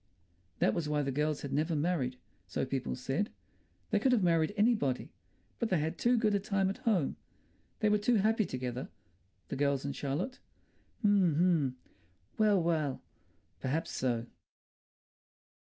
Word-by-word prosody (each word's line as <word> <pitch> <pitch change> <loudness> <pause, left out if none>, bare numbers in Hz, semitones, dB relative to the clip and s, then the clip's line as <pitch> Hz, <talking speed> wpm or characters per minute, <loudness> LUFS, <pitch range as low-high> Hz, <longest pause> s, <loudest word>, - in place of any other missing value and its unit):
That 110 - +3
was 155 -3 -2
why 150 -1 +1
the 135 - -1
girls 150 +2 -1
had 140 -1 -4
never 155 +3 +1
married, 145 -5 0 0.3
so 90 - -1
people 130 -1 -2
said. 135 - -1 0.6
They - - +3
could 260 -2 +3
have 220 -6 +3
married 165 -1 +3
anybody. 205 - +2 0.5
But 230 - 0
they 185 - +3
had 160 +3 -2
too 245 +1 +3
good 215 -2 +2
a 200 - +3
time 195 -1 0
at - - -8
home. 190 - +1 0.6
They 215 - +4
were 210 0 +3
too 235 +4 +2
happy 215 +1 +3
together, 125 0 -4 0.6
the - - -3
girls 140 -1 +1
and 140 -1 -3
Charlotte. 150 - -3 0.6
H'm, 200 -7 +4
h'm! 160 -6 +2 0.6
Well, 210 -3 +5
well. 160 -5 0 0.6
Perhaps 150 +5 -1
so.... 120 -3 -1
160 Hz, 155 wpm, -32 LUFS, 135-205 Hz, 0.6 s, Well